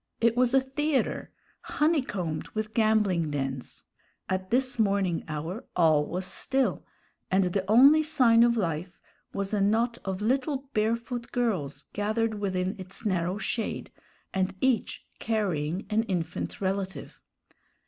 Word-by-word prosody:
It 230 0 +3
was 250 +1 +3
a 270 - +6
theatre, 270 +2 -1 0.3
honeycombed 230 - -1
with 215 0 -3
gambling 210 -8 +2
dens. 135 -3 -4 0.4
At 185 0 -2
this 255 +1 +1
morning 195 -5 +1
hour 160 - -4
all 155 -4 +4
was 180 +2 -3
still, 265 +7 0 0.5
and 190 +1 +3
the 195 - +1
only 275 +8 +7
sign 255 -7 +4
of 235 0 +4
life 175 -2 -2 0.3
was 200 +1 -3
a 205 - +1
knot 230 +4 +2
of 190 -1 -3
little 270 +5 0
barefoot 235 +2 -1
girls 170 - -1
gathered 215 +1 -1
within 190 -1 -1
its 185 +3 -8
narrow 185 -1 0
shade, 220 +1 -3 0.4
and 190 0 0
each 255 -2 0
carrying 185 -6 -1
an 215 +1 +3
infant 175 -5 -3
relative. 190 0 -3
205 Hz, 130 wpm, -28 LUFS, 185-235 Hz, 0.5 s, only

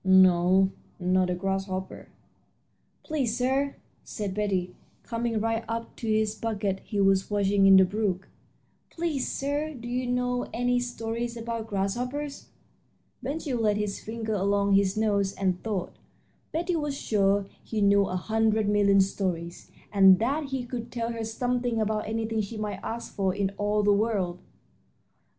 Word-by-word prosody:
"No, 190 0 +5 0.3
not 185 0 +2
a 180 - 0
grasshopper." 190 0 -3 1.0
"Please, 265 -8 -1
sir," 265 +3 +1 0.3
said 205 -4 -4
Betty, 190 -3 -1 0.3
coming 230 -1 -1
right 225 +1 0
up 230 0 -4
to 230 - -5
the 215 0 +1
bucket 205 -4 -1
he 205 - -3
was 195 -1 +3
washing 200 -1 +3
in 195 0 +9
the 190 - +7
brook 195 -1 -2 0.6
"please, 325 -6 -2
sir, 290 +2 -2
do 240 -1 -8
you 250 +1 -2
know 250 0 0
any 245 +1 +2
stories 235 -1 -3
about 230 -1 -4
grasshoppers?" 250 +9 -3 0.7
Ben 275 +4 -3
Gile 275 -7 -3
laid 210 -2 +2
his 210 -1 -2
finger 220 0 -4
along 200 0 +2
his 195 0 +3
nose 200 -3 +1
and 185 -2 0
thought. 200 -5 -3 0.6
Betty 345 +2 -1
was 295 -3 -2
sure 200 -3 +2 0.2
he 220 - -3
knew 200 -1 +4
a 185 - -3
hundred 220 +2 +1
million 200 -1 +4
stories, 180 -3 -3 0.2
and 195 -2 +7
that 275 +8 0
he 265 -2 -3
could 240 -1 -6
tell 235 -1 -2
her 230 -1 -4
something 245 +1 -1
about 215 -1 -1
anything 225 0 -1
she 215 +2 -6
might 210 -2 -3
ask 230 +1 -5
for 190 -2 0
in 195 -1 0
all 210 0 +1
the 205 0 +5
world. 200 -4 0
215 Hz, 155 wpm, -27 LUFS, 195-240 Hz, 1.0 s, in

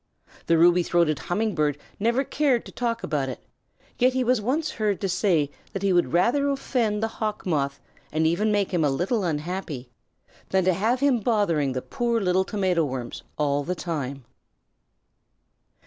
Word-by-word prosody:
The 165 - +4
Ruby 175 +2 +5
throated 170 -4 +1
Humming 210 +4 -1
Bird 150 -3 +1 0.2
never 235 +6 +2
cared 275 -4 +1
to - - -10
talk 235 -1 -2
about 145 -3 -1
it, 125 - -6 0.6
yet 255 +1 +4
he 260 0 +1
was 250 -2 +2
once 300 +8 0
heard 210 -4 -1
to 195 - -1
say 180 -6 +1 0.2
that 195 - -4
he 195 -1 +3
would 175 -1 +2
rather 245 - +2
offend 240 -6 0
the - - +2
Hawk 215 -1 -4
Moth 140 -5 -1 0.3
and 155 +1 +1
even 175 +7 +2
make 205 -2 +1
him 170 -3 +2
a 145 - +3
little 190 - 0
unhappy 155 -5 -3 0.6
than 190 -1 +2
to 185 - +4
have 225 +8 0
him 275 -4 +3
bothering 195 - +1
the 130 - -3
poor 235 - -1
little 190 -2 +2
Tomato 185 -4 0
Worms 130 -4 -4 0.2
all 145 -1 +1
the 180 +5 -2
time. 140 -7 -4
185 Hz, 175 wpm, -25 LUFS, 155-225 Hz, 0.6 s, Ruby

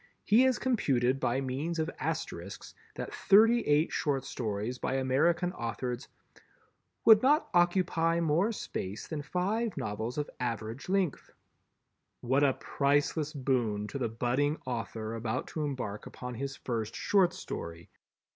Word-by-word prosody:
He 220 +4 +5
has 260 -1 +4
computed 135 - +1
by 130 +2 0
means 140 +6 -2
of 160 +1 -1
Asterisks, - - -4 0.2
that - - -5
thirty 225 +4 +5
eight 150 +2 +3
short 135 -4 -1
stories 110 +2 -3
by 130 - -1
American 165 +7 +2
authors 120 - -4 1.0
"would 220 -2 +9
not 295 +4 +3
occupy 175 -1 +3
more 170 +6 +2
space 100 - -5
than 155 -3 -4
five 195 +8 -1
novels 110 +4 -3
of 150 - -1
average 115 - -4
length." 190 -5 0 0.9
What 135 +4 +2
a 135 -2 +4
priceless 145 +3 0
boon 125 -8 0
to 140 - -5
the 120 -3 0
budding 125 +7 0
author 115 -3 -4
about 115 -1 -2
to 155 - -4
embark 125 -8 -4
upon 125 0 -7
his 135 +3 -4
first 115 -3 -3
short 190 -4 +3
story! 85 0 -7
140 Hz, 135 wpm, -30 LUFS, 120-170 Hz, 1.0 s, would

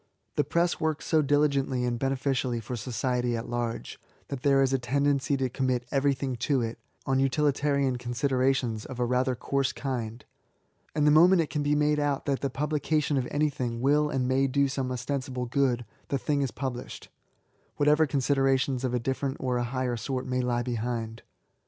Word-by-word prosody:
The 150 - +3
press 170 +5 0
works 155 -1 -1
so 160 -1 +3
diligently 140 -3 +1
and 120 -1 -1
beneficially 135 -2 0
for 120 +3 -5
society 120 +1 -1
at 115 - -5
large, 120 - -4 0.3
that 140 -3 -4
there 135 -1 +4
is 135 0 +1
a 135 - +2
tendency 140 +2 +1
to 135 -1 0
commit 125 -1 -1
everything 135 -2 0
to 135 +3 +1
it, 115 0 -4 0.3
on 135 0 +1
utilitarian 140 -1 +1
considerations 125 -2 0
of 130 -2 -8
a 125 - +2
rather 125 +1 +1
coarse 135 +2 0
kind: 120 -4 -4 0.7
and 150 -1 +2
the 150 - +6
moment 170 +3 +6
it 150 - -8
can 150 - -1
be 145 +1 +2
made 150 0 +2
out 145 -2 0
that 140 -2 0
the 140 - -1
publication 150 +2 0
of 130 -2 0
anything 135 -6 -1
will 145 +4 +3
and 130 -3 0
may 135 +1 +2
do 140 +1 +2
some 135 -1 -2
ostensible 130 0 -3
good, 125 -1 +1 0.2
the 140 - 0
thing 145 +2 0
is 135 - 0
published, 125 -1 -5
r - - -28 0.6
whatever 150 +2 +4
considerations 135 -1 +1
of 125 -1 0
a - - +1
different 135 +3 -2
or 125 -2 0
a 120 - 0
higher 125 0 -2
sort 130 +2 -3
may 125 0 0
lie 120 -1 0
behind. 115 -1 -3
135 Hz, 185 wpm, -28 LUFS, 125-140 Hz, 0.7 s, the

